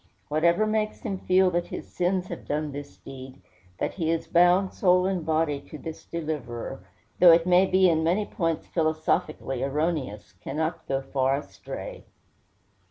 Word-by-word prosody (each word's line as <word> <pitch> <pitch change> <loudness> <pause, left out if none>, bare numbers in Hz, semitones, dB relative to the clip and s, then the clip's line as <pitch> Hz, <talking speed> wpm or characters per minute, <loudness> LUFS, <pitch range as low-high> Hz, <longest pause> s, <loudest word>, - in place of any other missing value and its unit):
Whatever 170 +7 +3
makes 215 0 -1
him 190 -2 -3
feel 185 0 +3
that 175 0 -1
his - - -7
sins 180 +1 -1
have - - -7
done 150 0 -2
this 145 0 -8
deed, 130 0 -11 0.4
that - - -2
he 165 -4 -2
is 165 0 0
bound, 180 +2 +4
soul 180 -1 +3
and 185 -3 -1
body, 155 -3 0
to 155 - -8
this 160 +1 -8
Deliverer, 140 - -5 0.4
though 180 -2 +9
it 165 0 +5
may 180 +1 +5
be 185 0 +4
in 160 -2 +2
many 185 +6 +1
points 165 -5 -2
philosophically 155 -4 -1
erroneous, 140 -6 -2
cannot 155 - -4
go 135 0 0
far 135 0 0
astray. - - -8
165 Hz, 160 wpm, -26 LUFS, 145-180 Hz, 0.4 s, though